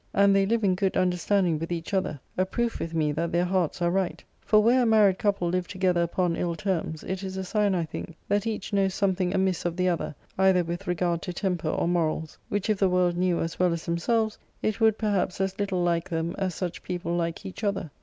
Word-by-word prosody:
And 200 0 +5
they 195 0 +3
live 230 +1 +1
in 190 -2 +4
good 190 +1 0
understanding 180 -2 +2
with 165 +2 -5
each 170 +2 -4
other: 185 -6 0 0.2
a 185 - +2
proof 235 +5 -2
with 165 0 -4
me 155 -2 +2
that 165 +3 -2
their 175 +1 +2
hearts 180 -2 0
are 170 - +2
right; 190 -1 -1 0.2
for 215 - +4
where 240 +4 +4
a - - +3
married 210 -4 +4
couple 200 -4 +1
live 180 0 -1
together 185 -3 +1
upon 170 0 0
ill 170 -1 -1
terms, 170 -5 -2
it 190 0 -4
is 190 -1 -5
a 190 - -2
sign, 205 0 +1
I 170 -2 0
think, 160 +1 -7
that 205 +2 +1
each 215 -2 -4
knows 195 -1 +2
something 190 -2 +1
amiss 190 -2 +1
of 175 -1 -1
the 180 0 +2
other, 170 -3 -2 0.2
either 190 -2 +4
with 175 +3 -5
regard 175 -1 0
to 180 - -5
temper 175 -4 -1
or - - 0
morals, 160 -2 -1
which 205 0 -1
if 215 -3 +1
the 195 - +4
world 180 -1 +2
knew 180 -1 +1
as 165 - -4
well 180 -2 +3
as 165 - -5
themselves, 220 +6 0 0.2
it 215 +1 -1
would 220 -1 +4
perhaps 200 -4 0
as 190 0 -1
little 195 -3 0
like 170 +1 0
them 165 0 -2
as 185 -3 -1
such 180 -3 -4
people 175 -1 -3
like 170 +2 -2
each 190 +3 -8
other. 200 -7 -1
185 Hz, 235 wpm, -26 LUFS, 170-195 Hz, 0.2 s, And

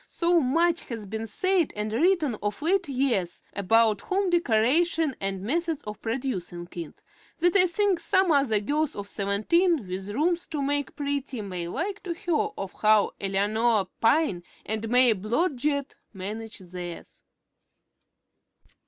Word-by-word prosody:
So 340 0 +2
much 330 +5 +1
has 225 -4 -6
been 220 +3 -5
said 370 - +1
and 210 +1 -3
written 310 - +2
of 205 +6 -3
late 365 0 +1
years 250 -10 -1
about 215 +1 +3
home 385 -1 0
decoration 315 +1 +2
and 195 -1 -2
the 190 - -8
methods 325 +4 -1
of 210 -1 -8
producing 215 -8 -4
it, 170 -3 -8 0.3
that 350 +2 +2
I 370 -2 +6
think 385 0 +1
some 375 +1 +2
other 275 -8 +3
girls 295 +7 -1
of 200 -1 -6
seventeen 215 - +1
with 190 +2 -5
rooms 335 +10 0
to 305 -3 -3
make 285 0 -1
pretty 280 -4 -3
may 180 -4 -5
like 380 - -3
to 345 -3 -4
hear 350 +5 0
of 195 - -5
how 215 -1 +4
Eleanor 205 +1 +1
Pyne 225 - +3 0.2
and 220 +1 -3
May 245 -1 +5
Blodgett 280 - -1 0.2
managed 210 -1 -7
theirs. 175 -2 -8
250 Hz, 145 wpm, -26 LUFS, 205-330 Hz, 0.3 s, I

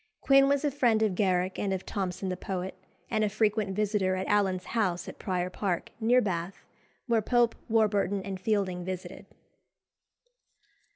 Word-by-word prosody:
Quin 275 0 +5
was 280 +1 +1
a 290 - +1
friend 235 -5 +2
of 210 -3 +1
Garrick 185 -1 0
and 200 - -1
of 190 -1 -3
Thomson 190 -1 -3
the 185 - -1
poet, 185 0 -4 0.4
and 215 - +1
a 210 - +2
frequent 210 -1 0
visitor 205 -2 +1
at 185 0 -2
Allen's 190 -3 +1
house 185 -7 0
at - - -9
Prior 180 -2 -2
Park, 185 -3 -2
near 240 +3 +4
Bath, 180 -2 -3 0.4
where 230 -3 +2
Pope, 240 +1 +2 0.2
Warburton, 205 -3 +2
and 190 -1 -5
Fielding 190 -3 0
visited. 185 0 -6
200 Hz, 160 wpm, -29 LUFS, 185-220 Hz, 0.4 s, Quin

